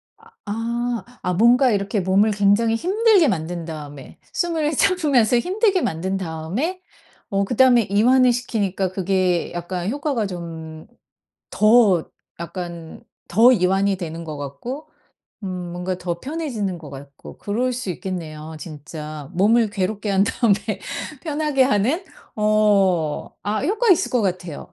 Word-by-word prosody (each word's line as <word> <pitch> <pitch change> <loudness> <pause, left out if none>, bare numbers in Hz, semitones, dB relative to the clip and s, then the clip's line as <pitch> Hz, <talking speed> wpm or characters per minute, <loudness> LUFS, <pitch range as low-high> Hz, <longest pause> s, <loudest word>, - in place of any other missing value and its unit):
아 445 - -23 0.2
아. 235 +2 -2 0.2
아 180 - -1
뭔가 240 +6 +5
이렇게 200 0 0
몸을 195 +4 +3
굉장히 205 +3 +3
힘들게 390 - +3
만든 170 -3 -2
다음에 145 -4 -9 0.2
숨을 325 -4 0
참으면서 285 - +3
힘들게 380 - +1
만든 185 - -2
다음에 190 - -3 0.5
어 200 0 +1
그다음에 245 +2 +4
이완을 245 +6 +4
시키니까 200 -6 -2
그게 185 -2 0
약간 175 +1 -3
효과가 285 -6 -1
좀 160 -3 -8 0.6
더 215 -6 +4 0.4
약간 170 -1 -7 0.3
더 230 +7 +6
이완이 195 -1 +2
되는 170 -2 -6
것 155 - -6
같고 235 - -7 0.6
음 195 - -3 0.2
뭔가 180 +1 -3
더 170 -1 -4
편해지는 260 - -3
것 155 -3 -11
같고 140 0 -11
그럴 245 +5 -1
수 240 -6 -4
있겠네요 160 -4 -6
진짜. 150 -2 -8
몸을 220 +5 +3
괴롭게 205 +2 -2
한 195 0 +3
다음에 220 0 +2 0.7
편하게 300 -4 +1
하는. 260 - +1 0.3
어. 200 -7 +2
아 210 +1 -1
효과 435 +6 +2
있을 355 - +3
것 245 - +2
같아요. 180 -5 -4
200 Hz, 270 characters per minute, -21 LUFS, 175-245 Hz, 0.7 s, 더